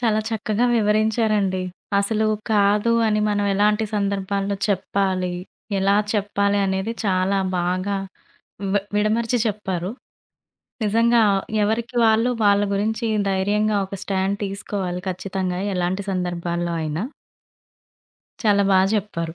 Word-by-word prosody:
చాలా 220 -3 +2
చక్కగా 220 +1 0
వివరించారండి. 215 -3 +1 0.4
అసలు 215 +2 0 0.3
కాదు 205 +2 +3
అని 215 -1 +2
మనం 205 -1 0
ఎలాంటి 210 +2 +2
సందర్భాల్లో 200 0 -1
చెప్పాలి, 190 -2 0 0.4
ఎలా 195 +1 +3 0.2
చెప్పాలి 200 -1 +1
అనేది 190 +3 -1
చాలా 190 0 +1 0.2
బాగా 185 +3 -1 0.8
వి 205 - +3 0.2
విడమరిచి 225 +3 +1
చెప్పారు. 190 -4 -2 1.0
నిజంగా 230 +2 +3 0.4
ఎవరికి 225 +3 -1
వాళ్ళు 225 +2 +3
వాళ్ళ 200 0 +4
గురించి 220 +3 -1 0.2
ధైర్యంగా 205 +3 +1
ఒక 195 - -7
స్టాండ్ 195 0 -1
తీసుకోవాలి 195 -2 -4
ఖచ్చితంగా 185 -1 -3
ఎలాంటి 180 +2 -1
సందర్భాల్లో 175 -1 -2
అయినా. 155 +4 -2 1.4
చాలా 205 -3 +4
బా 190 - +5 0.2
చెప్పారు. 170 -6 -3
200 Hz, 105 wpm, -22 LUFS, 190-215 Hz, 1.4 s, బా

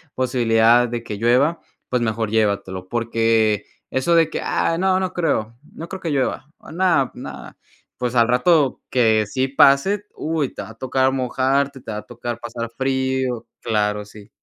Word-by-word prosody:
posibilidad 120 -1 +3
de 120 0 -4
que 105 -3 -6
llueva, 125 +9 +2 0.3
pues 125 -1 0
mejor 110 -1 -1
llévatelo 100 -4 -1
porque 115 -3 +1 0.2
eso 130 +6 +1
de 165 -1 +4
que: - - -4
"Ah, 165 - 0
no, 185 +1 +2
no 185 -1 -2
creo. 115 -9 -1 0.2
No 165 - -8
creo 190 0 -7
que 165 - -3
llueva, 140 +1 -1
ah, - - -13
no, 170 -6 +2
no". - - -9 0.4
Pues 125 0 -2
al 115 -1 +5
rato 135 +3 +2
que 110 -3 +3
sí 130 +4 -1
pase, 140 +10 +4
uy, 155 -3 -2
te - - -6
va 100 - -9
a - - -10
tocar 130 +2 +1
mojarte, 135 +1 0
te - - -7
va 105 - -4
a - - -8
tocar 120 -1 -6
pasar 115 -1 -5
frío. 130 -2 -1 0.2
Claro, 105 -2 0
sí. 105 0 -14
125 Hz, 175 wpm, -21 LUFS, 115-140 Hz, 0.4 s, al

